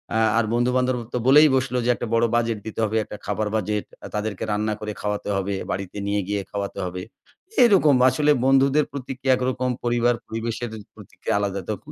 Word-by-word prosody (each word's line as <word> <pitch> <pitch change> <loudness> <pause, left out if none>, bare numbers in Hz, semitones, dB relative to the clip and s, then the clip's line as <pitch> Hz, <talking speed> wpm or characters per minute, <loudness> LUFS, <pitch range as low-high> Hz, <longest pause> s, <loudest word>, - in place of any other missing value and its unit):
আ - - +3 0.2
আর 115 - +1
বন্ধু-বান্ধব 125 +1 +1 0.2
তো - - 0
বলেই 150 +3 +8
বসলো 130 -1 0
যে - - +1
একটা 120 - -5
বড় 115 +1 +4
বাজেট 115 -2 0
দিতে 110 - -6
হবে, 110 +1 -1
একটা 105 - -9
খাবার 105 +1 -1
বাজেট 105 0 -1 0.3
তাদেরকে 105 -2 -3
রান্না 105 +1 0
করে 105 0 -4
খাওয়াতে 105 0 -3
হবে, 100 +1 -2 0.2
বাড়িতে 95 +1 -5
নিয়ে 100 0 0
গিয়ে 100 -1 -1
খাওয়াতে 100 -1 -4
হবে। 90 0 -5 0.6
এরকম 185 - +5
আসলে 150 +3 +2
বন্ধুদের 135 +2 +4
প্রতিক্রিয়া 130 0 -1
একরকম 130 0 -1
পরিবার 120 0 +2
পরিবেশের 115 +1 -4 0.3
প্রতিক্রিয়া - - -5
আলাদা 100 -1 -2
তখন। 145 +8 -7
115 Hz, 175 wpm, -23 LUFS, 105-130 Hz, 0.6 s, বলেই